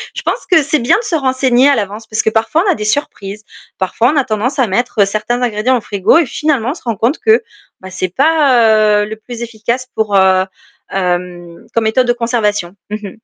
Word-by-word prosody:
Je - - -4
pense - - -2
que 330 -3 +6
c'est 290 +2 0
bien 240 - +3
de 470 - -4
se 345 - -1
renseigner 260 -2 +2
à 285 - +4
l'avance, 210 +1 -4
parce 215 - -1
que - - +2
parfois 225 +10 +1
on - - +4
a - - 0
des 210 - -5
surprises. 210 -5 -3 0.3
Parfois 225 +6 +1
on 305 - 0
a 275 - +2
tendance 235 +6 -2
à 250 - +3
mettre 210 0 +1
certains 215 +4 -2
ingrédients 245 +2 +1
au 235 - -5
frigo 200 - +2
et 335 - +3
finalement 270 -2 -1
on - - -3
se 335 - -14
rend 230 -2 -2
compte 235 - 0
que, 440 +1 +3 0.4
bah, 190 - -10
c'est 185 -1 -4
pas, 230 -8 +3
heu, - - -2
le 215 +1 -6
plus 235 +2 -9
efficace 235 +2 -3
pour, 215 -2 0
heu, 190 0 +4 0.5
hem, 175 -2 -3
comme 230 - +1
méthode 250 +3 +2
de 240 - +3
conservation. 215 -6 -1
Mmh 210 - -3
mh. 205 - -6
230 Hz, 225 wpm, -14 LUFS, 210-260 Hz, 0.5 s, que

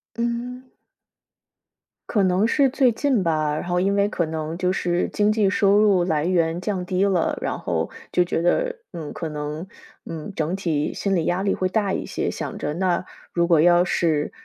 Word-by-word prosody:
嗯。 245 +2 -4 1.3
可 205 -4 +2
能 185 +3 +2
是 275 +3 +3
最 260 -1 +3
近 265 -4 +1
吧， 155 -3 0
然 - - -4
后 180 0 +1
因 200 +1 +1
为 200 0 +2
可 180 -5 -1
能 160 +1 -4
就 180 0 +1
是 175 -2 0
经 210 -1 +2
济 215 -2 +2
收 200 0 +3
入 200 -4 +4
来 155 -3 0
源 170 -1 +1
降 185 -2 -2
低 185 +1 0
了， 190 -4 +1
然 - - -2
后 - - -2 0.2
就 180 - +4
觉 175 -1 -2
得， 485 - +1 0.2
嗯， 160 -3 -6
可 165 - -5
能， 150 +3 -5 0.4
嗯， 165 +4 -6
整 165 +1 -1
体 160 -6 -1
心 195 - -1
理 165 - 0
压 180 +2 0
力 200 - +1
会 185 - 0
大 200 +1 0
一 - - -2
些， - - -2
想 - - -5
着 150 - -3
那 180 0 0 0.3
如 170 0 +2
果 170 -2 +4
要 175 +2 +5
是 160 -4 0
180 Hz, 210 characters per minute, -23 LUFS, 165-205 Hz, 1.3 s, 要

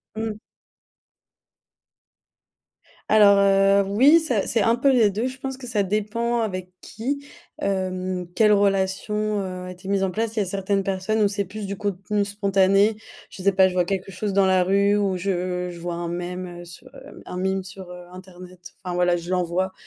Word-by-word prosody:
Mmh. 220 -1 -4 2.7
Alors, 205 -2 +6
heu, 195 0 +4
oui, 275 +11 +6
ça 250 -11 -1
c'est 230 - 0
un 230 +2 +3
peu 270 +3 +3
les 230 -5 +4
2, 215 +5 -2
je 260 +1 -5
pense 265 -1 -5
que 260 - -10
ça 220 -4 0
dépend 220 +4 -1
avec 185 -4 -4
qui, 280 +6 -5 0.3
hem, 185 - -2
quelle 215 -1 +5
relation, 200 +2 0
heu, 185 -1 -6
a 180 - -7
été 180 +1 -12
mise 195 -1 +1
en 190 - 0
place. 225 +2 -2
Il - - 0
y - - +2
a - - -5
certaines 195 +1 -1
personnes 195 +3 -1
où - - +4
c'est 200 0 -2
plus 205 +3 -7
du 200 - -4
contenu 205 +1 -2
spontané. 200 +1 +2 0.3
Je 190 - -10
sais 200 +1 +3
pas, 190 0 +5
je 185 - -4
vois 180 -1 +2
quelque 195 0 -3
chose 200 +2 -3
dans 195 0 +3
la 185 -1 +3
rue 200 +2 +2
ou 195 -3 0
je 180 -1 -2
je 170 - -10
vois 175 0 -4
un 170 0 -4
meme, 175 0 -5
heu, - - -11
sur, 170 0 -13
hem, - - -13
un 180 - -7
meme 190 0 -1
sur, 190 -1 -11
heu, 180 0 -10
internet. 185 -1 -13
Enfin, 180 -1 -4
voilà, 180 0 +2
je 175 +2 -7
l'envoie 185 +1 -1
195 Hz, 195 wpm, -23 LUFS, 185-210 Hz, 2.7 s, Alors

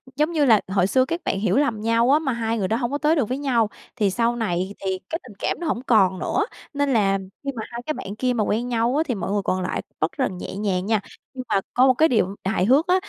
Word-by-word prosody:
giống 300 +4 +1
như 300 -4 +2
là 220 -5 +5
hồi 190 -1 +2
xưa 255 +5 +3
các 335 +4 -3
bạn 195 - -1
hiểu 220 +5 +1
lầm 235 -7 +1
nhau 230 +3 +3
á, 295 - +5
mà 280 -5 -1
hai 230 -1 -1
người 190 -3 0
đó 225 - 0
hông 240 0 -2
có 285 - 0
tới 305 +2 +2
được 270 -9 0
với 255 - -1
nhau, 245 -6 +1 0.3
thì 210 -5 +2
sau 235 +3 +1
này 190 -4 -2
thì 190 -1 -1
cái 325 - -2
tình - - -12
cảm - - -1
nó 340 - -3
hổng 240 - -1
còn 195 -7 +3
nữa, 405 - 0 0.3
nên 285 -1 +1
là 195 -4 +3 0.3
khi 280 - -2
mà 220 - -4
hai 235 0 -6
cái 310 - -1
bạn 200 -8 -7
kia 250 +2 0
mà 225 - 0
quen 225 +4 -1
nhau 235 +1 +1
á, 310 - +3
thì 245 - -1
mọi 190 -1 -3
người 205 0 +1
còn 185 0 0
lại 180 - -2 0.2
bất 155 - 0
rần 185 - -1
nhẹ 180 - -6
nhàng 195 -3 -1
nha. 220 -1 +1 0.3
Nhưng 255 - -6
mà 195 - +2
có 255 +2 +5
một 260 - +6
cái 315 +5 +3
điều 200 -5 +1
hài 190 -2 +1
hước 275 - +4
á, 360 - +4
230 Hz, 290 wpm, -23 LUFS, 200-270 Hz, 0.3 s, một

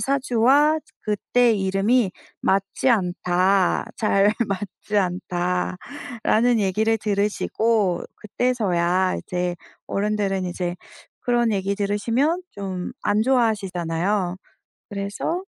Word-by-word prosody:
사주와 275 +3 +3
저 - - -27
그때 230 +3 +2
이름이 195 +3 +2 0.3
맞지 195 +6 +1
않다. 185 -2 +2
잘 205 -1 +3 0.2
맞지 200 +2 -4
않다."라는 190 +6 -1
얘기를 215 +3 +2
들으시고 210 -1 0
그때서야 190 -6 0
이제 180 -1 -3 0.3
어른들은 200 -2 -1
이제 175 0 -3 0.4
그런 240 -2 +1
얘기 195 0 0
들으시면 230 - 0
좀 190 -3 -5
안 210 +1 +2
좋아하시잖아요. 195 -6 0 0.5
그래서 205 - -3
200 Hz, 225 characters per minute, -23 LUFS, 185-230 Hz, 0.5 s, 사주와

